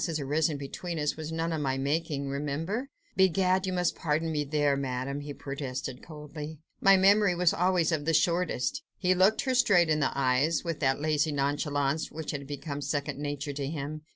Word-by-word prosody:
has 160 -2 -2
arisen 150 +2 0
between 165 +5 -5
us, 150 -1 0
was 155 0 -6
none 165 +1 -1
of 155 - -2
my 135 -2 0
making, 140 0 -1
remember." 155 - -3 0.3
"Begad! 190 0 +3
you 185 - -1
must 180 -1 +1
pardon 160 +1 -1
me 150 -1 0
there, 145 -1 +1
Madame!" 135 +1 -3
he 145 0 -6
protested 135 -2 -5
coldly, 150 0 -8 0.2
"my 195 0 +6
memory 195 0 +5
was 175 -1 +3
always 180 -2 +2
of 150 -2 -1
the 165 - +1
shortest." 175 - +1 0.2
He 185 -1 +2
looked 190 +4 +4
her 260 -2 0
straight 200 -10 +4
in 155 -1 +2
the 145 - 0
eyes, 135 +4 +2
with 165 -3 -3
that 135 -2 +1
lazy 155 0 +1
nonchalance 145 +1 0
which 160 -1 -5
had 140 -2 -5
become 145 0 -5
second 145 -1 -2
nature 145 0 -3
to 140 -1 -3
him. 150 0 -5
150 Hz, 190 wpm, -29 LUFS, 140-170 Hz, 0.3 s, my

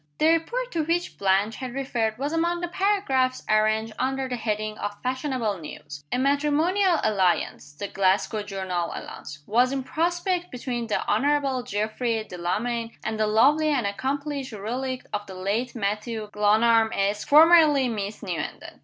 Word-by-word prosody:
The 310 - +4
report 475 +10 0
to 325 - 0
which 340 +3 -2
Blanche 200 +3 +2
had 255 -2 -6
referred 230 -5 -1
was 285 +4 -2
among 340 +1 0
the 350 - -1
paragraphs 345 -10 +1
arranged 215 +1 +2
under 265 +1 -1
the 250 - -3
heading 215 -2 -2
of 205 0 -4
"Fashionable 255 - -1
News." 145 -2 -9
"A - - +1
matrimonial 300 +7 +2
alliance" 185 -7 0
(the 200 +7 -5
Glasgow 195 +3 +1
journal 190 -4 -3
announced) 145 0 -8
"was 245 +4 +3
in 270 -1 -2
prospect 350 +4 -1
between 245 -2 -4
the 215 - -1
Honorable 275 +3 +1
Geoffrey 220 0 -2
Delamayn 225 +7 -2
and 220 0 -3
the 215 - +2
lovely 285 +9 +4
and 275 -7 +1
accomplished 275 +5 -3
relict 250 +5 -4
of 205 0 -3
the 190 - -9
late 210 +7 -2
Mathew 215 0 -3
Glenarm, 220 +2 +3
Esq., 200 +1 -1
formerly 305 -3 +6
Miss 210 -2 -4
Newenden." 180 -4 -5
240 Hz, 155 wpm, -25 LUFS, 210-285 Hz, -, formerly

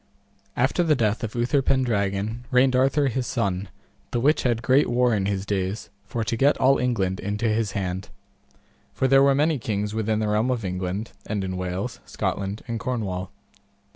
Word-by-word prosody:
After 135 +8 +2
the 160 -3 +3
death 110 -3 0
of 110 0 -4
Uther 125 +4 +2
Pendragon 110 -3 0
reigned 125 +1 +4
Arthur 135 +3 +3
his 130 0 -2
son, 100 -5 -1 0.4
the 120 - -1
which 145 +5 +3
had 120 -2 0
great 130 +5 +4
war 125 0 +3
in 100 -2 0
his 100 -1 -2
days 100 +1 -2 0.2
for 115 +1 -2
to 115 - -1
get 140 +5 +3
all 135 +1 +4
England 100 -7 0
into 105 +4 -2
his 110 -2 0
hand. 95 -1 -3 0.9
For 130 - +2
there 135 +1 +6
were 140 0 +5
many 150 0 +2
kings 105 -2 -2
within 110 -1 0
the 110 0 0
realm 105 +4 +1
of 120 -5 -1
England, 90 +3 -3 0.2
and 105 -2 -2
in 95 -1 -3
Wales, 90 +6 -4
Scotland, 100 +2 -3
and 115 -1 -3
Cornwall. 100 -8 -3
110 Hz, 180 wpm, -24 LUFS, 100-125 Hz, 0.9 s, there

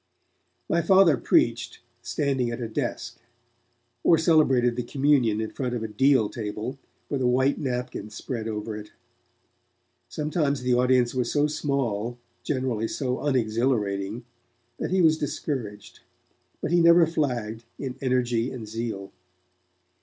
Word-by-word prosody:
My 170 - +2
Father 190 -4 +5
preached, 120 - +1 0.2
standing 135 -4 -1
at 115 - -4
a 120 - -3
desk; 120 -1 -4 0.8
or 165 - +5
celebrated 135 -8 +3
the 125 - -1
communion 130 -4 +2
in 110 -1 -3
front 125 -2 -3
of 115 - -3
a - - -2
deal 120 +1 +3
table, 110 +5 -5 0.3
with 140 -2 -2
a 125 - +2
white 130 +3 +2
napkin 125 -6 -3
spread 110 +1 -5
over 105 0 -4
it. 105 0 -9 1.2
Sometimes 150 -3 -1
the 125 0 +2
audience 125 -1 +3
was 125 -2 -1
so 145 0 +2
small, 130 -7 -2 0.2
generally 130 -6 -1
so 130 0 -2
unexhilarating, 115 -5 0 0.6
that - - -2
he 185 0 +2
was 160 -1 +4
discouraged, 130 -7 -4 0.6
but - - -2
he 175 0 +4
never 170 0 +7
flagged 120 -8 -2
in 130 -2 -5
energy 125 -2 +1
and 120 -4 -7
zeal. 110 -3 -5
125 Hz, 135 wpm, -26 LUFS, 115-140 Hz, 1.2 s, never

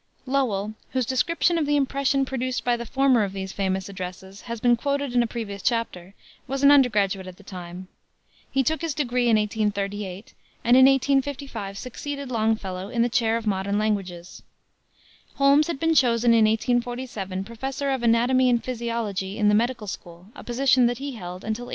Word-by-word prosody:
Lowell, 225 -7 0 0.2
whose 260 -2 +1
description 335 +7 +1
of 300 - -1
the 295 - +2
impression 275 -1 +1
produced 255 -1 -3
by 245 -1 +3
the 235 0 -6
former 265 -2 +3
of 195 -1 -3
these 190 -1 -5
famous 190 -1 -2
addresses 190 0 -8
has 235 -1 -4
been 240 +1 +4
quoted 280 +1 -2
in 245 - +4
a 235 - 0
previous 215 -4 -6
chapter, 200 -5 -2 0.3
was 270 +1 -3
an 280 - +8
undergraduate 205 -9 +3
at 185 -1 -10
the 200 - -16
time. 180 -1 -9 0.6
He 270 - +1
took 315 +5 -1
his 330 -4 -2
degree 250 -4 0
in 220 - +5
1838 205 -2 -3 0.3
and 240 +2 +5
in 260 0 +8
1855 270 -6 0
succeeded 280 +3 -6
Longfellow 215 -5 -1
in 235 0 +1
the 240 - +1
chair 230 -2 +1
of 230 - -6
Modern 200 0 0
Languages. 190 -5 -3 0.9
Holmes 280 +2 +4
had 335 -5 -3
been 325 +1 +2
chosen 240 -4 +3
in 225 -1 +5
1847 230 -4 -1
Professor 265 +5 -4
of 265 -2 -1
Anatomy 245 +2 +3
and 240 -1 +1
Physiology 230 -5 -3
in 210 -2 +3
the - - +3
Medical 235 0 0
School 175 -1 -9
a - - -11
position 255 0 +3
which 240 0 -2
he 280 +2 -5
held 180 -5 -8
until 220 +3 -3
1882. - - -11
235 Hz, 180 wpm, -24 LUFS, 200-260 Hz, 0.9 s, an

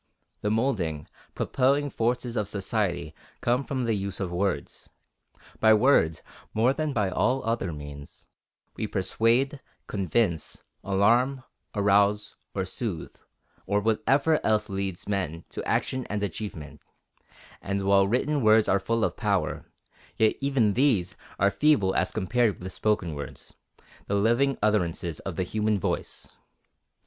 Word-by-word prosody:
The 105 - 0
moulding, 105 - -1 0.3
propelling 140 +2 +1
forces 120 +1 -1
of 105 -4 0
society 100 -5 -2 0.3
come 125 +3 +1
from 130 -2 -2
the 115 - +1
use 100 -2 -3
of 95 -3 -3
words. 95 +2 -2 0.7
By 110 0 +6
words, 105 - +3 0.3
more 120 +4 +3
than 155 0 -2
by 105 -7 0
all 130 +7 +1
other 115 -6 -1
means, 75 -1 -10 0.5
we 110 - -3
persuade, 115 +9 +1 0.3
convince, 95 -3 -1 0.2
alarm, 120 +7 +2 0.3
arouse, 105 +1 +2 0.2
or 95 -2 -1
soothe, 95 -3 -5 0.5
or 100 +1 +2
whatever 135 +8 +2
else 105 -1 +1
leads 95 -2 -4
men 95 -5 -2
to - - -6
action 130 -1 -1
and 105 0 -2
achievement; 80 -8 -6 0.8
and 100 0 -2
while 100 0 +4
written 135 +6 +1
words 110 -1 +5
are 100 - +3
full 115 +4 0
of - - 0
power, - - -1 0.5
yet 110 -1 +3
even 135 -7 +2
these 120 -9 +2 0.2
are 100 +1 +3
feeble 140 -11 +3
as - - +1
compared 110 -1 +1
with 95 +1 -7
spoken 105 -6 0
words, 70 -1 -8 0.5
the 100 - 0
living 120 +7 +2
utterances 85 -6 0
of 95 - -6
the 95 - 0
human 105 +2 0
voice. - - -4
105 Hz, 135 wpm, -27 LUFS, 95-120 Hz, 0.8 s, By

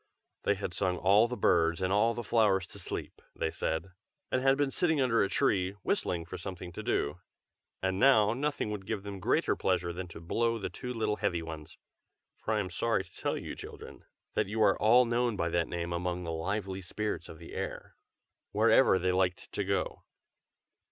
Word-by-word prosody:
They 100 - +3
had 95 -3 -4
sung 90 0 0
all 100 +6 +5
the 125 +1 -4
birds 85 -3 +3
and 95 0 0
all 115 +3 +3
the 120 - -4
flowers 105 -5 +3
to - - -10
sleep, - - -5
they - - -1
said, 85 +4 -2 0.4
and 130 - +1
had 135 +1 +4
been 145 -2 +1
sitting 160 -2 +1
under 125 -4 +3
a 100 - +2
tree, 95 -1 +1
whistling 85 -2 0
for 90 +2 -7
something 90 -1 -6
to - - -6
do, 75 +5 -1 0.6
and 95 0 0
now 110 -5 +5
nothing 140 -4 -1
would 100 -2 -5
give 105 -3 -2
them 100 -1 -6
greater - - +2
pleasure 90 -2 0
than 90 +1 -5
to 80 - -10
blow 115 +7 0
the 95 -4 -4
two 125 +7 -6
little 110 -3 -1
heavy 85 -1 -1
ones 80 -2 -8 0.6
(for 110 - -2
I - - +1
am 95 -3 -3
sorry 115 +2 +1
to 95 - -20
tell - - -2
you, - - -6
children, - - -10 0.3
that - - +1
you 110 +3 -3
are 100 - +5
all 120 +4 +6
known 120 -1 +1
by 85 -3 0
that 85 0 +1
name 85 0 -3
among 90 +1 -2
the 85 - -3
lively 95 +3 -3
spirits 105 +4 -4
of - - -9
the - - -11
air,) - - -5 0.6
wherever - - +5
they 90 0 +1
liked 90 -1 0
to - - -1
go. - - -1
95 Hz, 200 wpm, -31 LUFS, 90-115 Hz, 0.6 s, all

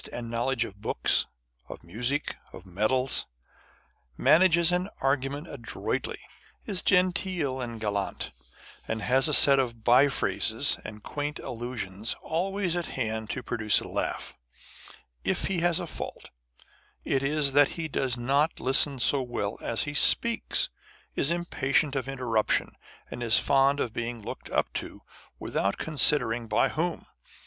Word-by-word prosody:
and 115 -1 -7
knowledge 120 0 -1
of 100 -2 -13
books, - - 0 0.4
of - - -10
music, 120 - -3 0.2
of - - -12
medals; 110 +8 0 0.9
manages 170 +1 +4
an 180 +2 -1
argument 135 +3 -2
adroitly; 120 -8 -5 0.5
is 190 -3 0
genteel 180 -7 0
and 115 -2 -6
gallant, 100 -2 -4 0.6
and 110 -1 -4
has 130 +4 +4
a 150 - 0
set 140 -1 +8
of 115 -4 -3
bye 125 +4 +5
phrases 100 -8 +1
and 105 0 -10
quaint 145 0 -5
allusions 115 -3 -5
always 185 +2 -2
at 175 -1 -3
hand 110 -3 -4
to 130 - -5
pro - - -4
duce 105 -2 +4
a - - -7
laugh: - - -4
â€" - - -18 0.3
if - - 0
he 190 -3 -1
has 175 0 +1
a 175 - -4
fault, - - -8 0.7
it 135 - -1
is 145 0 +2
that 145 +1 +5
he 165 -1 -3
does 130 -4 -1
not 140 +6 0
listen 135 +1 +4
so 130 +2 +1
wrell 115 -4 -4
as 115 - -1
he 150 - -5
speaks, 235 - +5 0.4
is 140 - +2
impatient 150 -4 -1
of 135 -1 -3
interruption, 120 -5 -1 0.4
and - - -7
is 115 -2 +4
fond 140 +1 +2
of 115 - -3
being 120 0 -5
looked 105 - -9
up - - -1
to, - - -7 0.3
without 100 0 -2
considering 125 -6 +3
by 110 - +1
whom. 170 +2 -3
135 Hz, 150 wpm, -26 LUFS, 115-155 Hz, 0.9 s, set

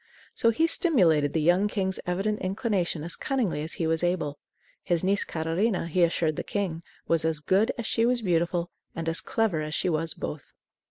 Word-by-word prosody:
So 230 - +2
he 230 +9 +2
stimulated 175 - +3
the 160 - +1
young 180 +5 +4
king's 190 -3 -2
evident 195 +4 -1
inclination 185 - -1
as 170 - -3
cunningly 240 - -1
as 160 +2 -2
he 165 - -2
was 160 +1 +1
able. 165 -5 -1 0.4
His 175 -1 0
niece 200 +2 +2
Catarina, 170 +5 -1
he 170 +2 0
assured 165 -2 +2
the - - -2
king, 185 -6 -3 0.3
was 165 -1 +2
as 160 -1 0
good 190 +8 +2
as 235 - -4
she 225 - +1
was 245 -1 +1
beautiful, 175 -1 0 0.2
and 165 0 -4
as 165 0 +3
clever 210 -9 0
as 155 0 -3
she - - 0
was 160 0 +1
both. 150 -2 -7
175 Hz, 195 wpm, -27 LUFS, 160-205 Hz, 0.4 s, young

